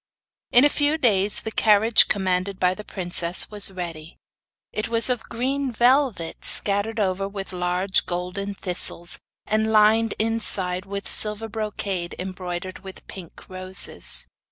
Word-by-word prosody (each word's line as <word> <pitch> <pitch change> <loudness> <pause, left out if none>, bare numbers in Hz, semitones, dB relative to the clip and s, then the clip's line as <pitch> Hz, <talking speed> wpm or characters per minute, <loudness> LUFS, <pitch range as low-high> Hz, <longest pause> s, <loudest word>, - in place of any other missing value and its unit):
In 245 +4 +6
a - - +4
few 295 +1 0
days 205 -7 +3
the 220 - -6
carriage 220 +1 +4
commanded 190 -1 -2
by 180 0 +2
the 210 - -10
princess 175 -2 -2
was 205 -2 +3
ready. 170 -4 -7 0.6
It 215 - -3
was 230 +2 +3
of 245 -2 -1
green 265 +3 -2
velvet, 240 - +1
scattered 205 +3 +2
over 195 -1 -1
with 195 -1 -7
large 180 +2 -1
golden 180 +3 -4
thistles, 175 -2 0 0.3
and 220 +1 0
lined 220 +1 +3
inside 200 -4 -1
with 200 0 -5
silver 210 +1 +5
brocade 200 -5 -4
embroidered 185 0 -6
with 190 0 -12
pink 180 -4 -12
roses. 185 - -1
200 Hz, 135 wpm, -23 LUFS, 185-220 Hz, 0.6 s, In